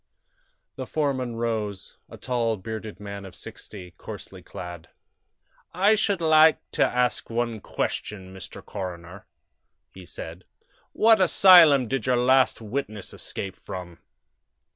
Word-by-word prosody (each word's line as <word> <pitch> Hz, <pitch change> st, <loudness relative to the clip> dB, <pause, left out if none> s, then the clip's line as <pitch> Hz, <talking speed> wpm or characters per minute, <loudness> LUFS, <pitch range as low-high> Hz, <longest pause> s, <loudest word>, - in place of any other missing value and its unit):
The 130 Hz, -1 st, -5 dB
foreman 130 Hz, -6 st, -1 dB
rose 110 Hz, -4 st, -3 dB
a -, -, -11 dB
tall, 115 Hz, -3 st, -1 dB
bearded 110 Hz, +2 st, -7 dB
man 100 Hz, -1 st, -7 dB
of 95 Hz, -2 st, -11 dB
sixty, 90 Hz, -1 st, -10 dB
coarsely -, -, -9 dB
clad. 85 Hz, -1 st, -9 dB, 0.9 s
"I 200 Hz, +4 st, +4 dB
should 200 Hz, -4 st, +1 dB
like 155 Hz, -1 st, +6 dB
to -, -, +2 dB
ask 125 Hz, 0 st, 0 dB
one 115 Hz, -1 st, -2 dB
question, 95 Hz, -2 st, -4 dB
Mr. 95 Hz, -, -10 dB
Coroner," 90 Hz, 0 st, -7 dB, 0.7 s
he 95 Hz, -2 st, -12 dB
said. 85 Hz, +3 st, -9 dB, 0.5 s
"What 220 Hz, -2 st, +4 dB
asylum 170 Hz, -8 st, +7 dB
did 135 Hz, +2 st, -1 dB
this -, -, -8 dB
yer 125 Hz, -, +3 dB
last 130 Hz, 0 st, +3 dB
witness 110 Hz, -3 st, -5 dB
escape 95 Hz, -1 st, -6 dB
from?" 90 Hz, -2 st, -9 dB
115 Hz, 125 wpm, -25 LUFS, 95-135 Hz, 0.9 s, asylum